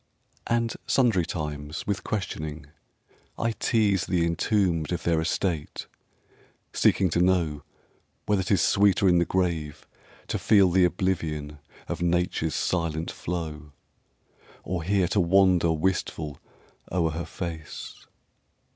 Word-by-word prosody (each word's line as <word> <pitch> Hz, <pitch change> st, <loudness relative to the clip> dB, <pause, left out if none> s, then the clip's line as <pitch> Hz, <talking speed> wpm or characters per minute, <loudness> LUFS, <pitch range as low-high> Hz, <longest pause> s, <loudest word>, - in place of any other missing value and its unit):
And 115 Hz, -1 st, +1 dB
sundry 110 Hz, -10 st, +2 dB
times 75 Hz, -2 st, -5 dB
with 100 Hz, -1 st, -2 dB
questioning 80 Hz, -7 st, -4 dB, 0.7 s
I 115 Hz, -, 0 dB
tease 105 Hz, -4 st, +1 dB
The 85 Hz, -3 st, +1 dB
entombed 85 Hz, -1 st, 0 dB
of 90 Hz, -, -2 dB
their 85 Hz, -2 st, +2 dB
estate 80 Hz, -1 st, -2 dB, 0.9 s
seeking 95 Hz, -3 st, +3 dB
to 85 Hz, -, +2 dB
know 85 Hz, -5 st, +1 dB, 0.6 s
Whether 105 Hz, -2 st, +2 dB
'tis 95 Hz, -3 st, +2 dB
sweeter 100 Hz, -1 st, +4 dB
in 90 Hz, -1 st, +5 dB
the 85 Hz, -, +2 dB
grave 85 Hz, -6 st, -2 dB, 0.4 s
to -, -, -1 dB
feel 100 Hz, -4 st, +4 dB
The 90 Hz, 0 st, +5 dB
oblivion 80 Hz, -5 st, -2 dB, 0.3 s
of -, -, -4 dB
Nature's 85 Hz, -2 st, 0 dB
silent 85 Hz, -2 st, -1 dB
flow, 75 Hz, -4 st, -5 dB, 0.9 s
Or 90 Hz, -2 st, -3 dB
here 95 Hz, +1 st, +1 dB
to 105 Hz, -, +1 dB
wander 90 Hz, -1 st, +4 dB
wistful 80 Hz, -3 st, -2 dB, 0.5 s
o'er 85 Hz, -3 st, +1 dB
her 85 Hz, +2 st, -4 dB
face. 80 Hz, -4 st, -6 dB
85 Hz, 120 wpm, -26 LUFS, 80-95 Hz, 0.9 s, in